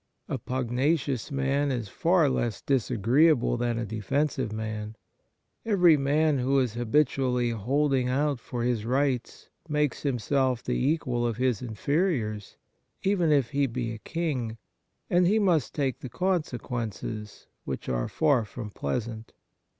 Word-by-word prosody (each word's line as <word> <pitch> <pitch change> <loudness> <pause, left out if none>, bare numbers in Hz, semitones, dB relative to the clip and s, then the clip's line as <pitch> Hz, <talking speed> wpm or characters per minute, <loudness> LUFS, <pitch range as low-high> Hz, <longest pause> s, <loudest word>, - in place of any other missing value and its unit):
A - - -3
pugnacious 130 +2 -1
man 140 +1 +1
is 120 -4 -2
far 170 - +2
less 120 -5 -1
dis 135 -6 +1
agreeable 125 +5 +3
than 120 -1 -1
a 115 - -2
defensive 120 +4 -1
man. 110 0 -4 0.7
Every 180 -7 +5
man 145 +1 +2
who 135 +2 +2
is 125 -5 +1
habitually 125 0 +1
holding 130 +3 +1
out 140 0 +1
for 120 0 -4
his 120 -3 0
rights 130 0 -1 0.2
makes 150 -2 0
himself 130 -1 0
the - - -1
equal 125 -4 0
of 115 -2 -1
his 125 -4 +1
inferiors, 120 - -1 0.5
even 190 -5 +2
if 140 -6 +2
he 140 0 +2
be 120 -1 -3
a 110 - -7
king, 130 -8 -3 0.5
and 175 0 +3
he 210 +4 +3
must 175 - +2
take 135 -3 -1
the 130 - -7
consequences, 120 - -3 0.2
which - - -5
are - - -1
far 145 -7 +2
from 105 0 -7
pleasant. 110 - -4
130 Hz, 140 wpm, -27 LUFS, 115-145 Hz, 0.7 s, Every